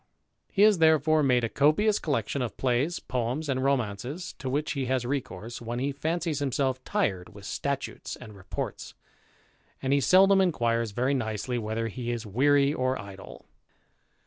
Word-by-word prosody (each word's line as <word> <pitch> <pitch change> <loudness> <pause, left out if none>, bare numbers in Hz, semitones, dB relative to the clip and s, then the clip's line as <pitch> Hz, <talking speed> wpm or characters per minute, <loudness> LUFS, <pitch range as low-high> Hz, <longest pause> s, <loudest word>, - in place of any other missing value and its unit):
He 200 - +3
has 210 -4 +6
therefore 155 -1 +4
made 125 -4 +3
a - - +2
copious 155 - +3
collection 140 -2 -1
of 120 - -4
plays, 135 +7 0
poems, 125 +5 -2
and 130 -2 0
romances, 135 - -2
to 130 - -4
which 145 +4 -1
he 135 -3 -2
has 130 -1 0
recourse 120 -5 -4
when 120 +1 -4
he 135 +3 -1
fancies 160 +2 -2
himself 130 -2 -1
tired 95 - -1
with - - -11
statutes - - -3
and 105 -1 -12
reports; 95 -1 -6 0.8
and 135 +1 0
he 140 - +3
seldom 195 +4 +6
inquires 115 -10 +1
very 125 +6 0
nicely 120 0 -2
whether 110 +1 -2
he 120 +2 -5
is 120 -1 -4
weary 140 +6 +3
or 130 -4 0
idle. 100 0 -10
130 Hz, 160 wpm, -27 LUFS, 115-150 Hz, 0.8 s, has